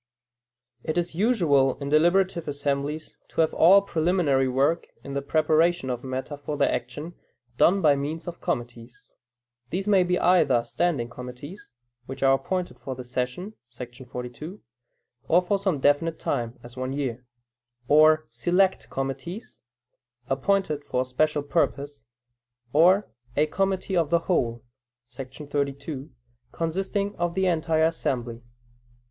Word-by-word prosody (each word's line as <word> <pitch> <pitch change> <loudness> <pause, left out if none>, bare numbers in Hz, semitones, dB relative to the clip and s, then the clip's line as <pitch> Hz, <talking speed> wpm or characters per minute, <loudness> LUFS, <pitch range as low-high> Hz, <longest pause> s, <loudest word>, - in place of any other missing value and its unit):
It 155 - -2
is 175 -1 -1
usual 165 - +2
in 140 -1 -5
deliberative 175 +3 +3
assemblies, 145 +1 -3
to - - 0
have 160 - +1
all 195 +4 +6
preliminary 160 -7 +1
work 135 +6 +1 0.2
in 140 - -7
the 140 - -1
preparation 155 0 +2
of 125 -1 -4
matter 130 +3 -4
for 145 +1 -5
their - - +2
action, 160 +4 -4 0.4
done 190 +1 +4
by 145 -2 +6
means 150 +4 -4
of 175 0 -7
committees. 120 -6 -5 0.6
These 190 +2 -2
may 200 -3 +5
be 180 0 +1
either 150 -10 +4
"standing 150 -5 -1
committees" 125 +9 -10 0.4
(which 135 +1 -6
are 135 0 +6
appointed 180 +7 -2
for 130 - -6
the 125 - -7
session 125 - -4 0.2
[§ 125 +1 -10
42], 125 - -7 0.7
or 170 - +5
for 200 +2 0
some 190 -7 0
definite 145 +4 +2
time, 120 0 -3
as 120 +1 -12
one 130 +1 -3
year); 130 -4 -3 0.6
or 155 +2 +5
"select 180 +10 +1
committees," 150 - -5 0.7
appointed 190 -7 0
for 125 - -1
a - - -11
special 145 +3 0
purpose; 145 -2 -1 0.7
or 180 +7 +5 0.3
a 150 - +4
"committee 190 +3 -1
of 165 -4 +2
the 170 - +3
whole" 120 -10 0 0.5
[§ 135 +3 -9
32], 140 0 -3 0.4
consisting 195 +5 -2
of 175 0 -1
the 190 0 +1
entire 160 -2 +2
assembly. 120 -7 -2
150 Hz, 140 wpm, -25 LUFS, 135-175 Hz, 0.7 s, all